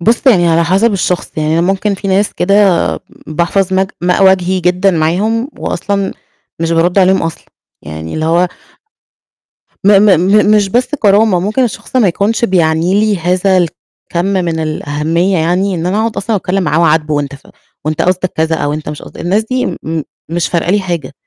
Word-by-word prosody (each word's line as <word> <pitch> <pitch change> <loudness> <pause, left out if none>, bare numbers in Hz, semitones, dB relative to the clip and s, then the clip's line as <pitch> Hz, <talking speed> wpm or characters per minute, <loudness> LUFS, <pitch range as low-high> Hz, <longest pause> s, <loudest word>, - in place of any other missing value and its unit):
بُص 230 +9 +1
يعني 180 -9 +5
على 165 +1 +2
حسب 195 +6 +2
الشخص، 180 -2 -2
يعني 155 +1 0
أنا - - +3
ممكن 195 +2 0
في 195 +1 -5
ناس 195 +2 +1
كده 200 +3 +1 0.7
باحفظ 175 +4 -1
ماء- 190 0 +1
ماء 180 +2 +2
وجهي 190 -1 +2
جدًا 180 +2 +2
معاهم 195 - 0
وأصلا 200 -1 -2 0.5
مش 165 0 0
بارد 175 +3 +2
عليهم 190 0 +3
أصلًا 165 -1 -4 0.4
يعني 80 +2 -7
اللي 155 - -2
هو 170 +3 +2 1.4
م - - +4
م 210 - +5
م 205 +3 +3
مش 205 -2 +1
بس 245 +6 0
كرامة، 205 -3 +3
ممكن 215 +8 0
الشخص 245 +2 -5
ما 230 -6 +4
يكونش 205 +6 0
بيعني 175 0 +1
لي 215 -2 +1
هذا 180 +3 +1
الكم 175 0 -3
من 180 -4 -1
الأهمية 155 +4 -1
يعني، 180 +4 0
إن 170 0 -3
أنا 195 +4 0
أقعد 225 0 -2
أصلًا 215 +2 -1
أتكلم 190 0 -1
معاه، 165 +1 +2
أعاتبه 155 -1 +1
وأنت 145 -1 -2
ف 140 - -16 0.4
وأنت 155 0 -1
قصدك 185 0 0
كذا 160 +1 +1
أو 145 -1 -2
أنت 150 0 -5
مش 150 -1 -7
قصدك، - - -11
الناس 195 +6 0
دي 255 0 0
م 160 0 -4 0.3
مش 170 +1 -1
فارقة 170 0 -1
لي 205 +2 +2
حاجة، 170 -8 -4
180 Hz, 185 wpm, -13 LUFS, 165-200 Hz, 1.4 s, يعني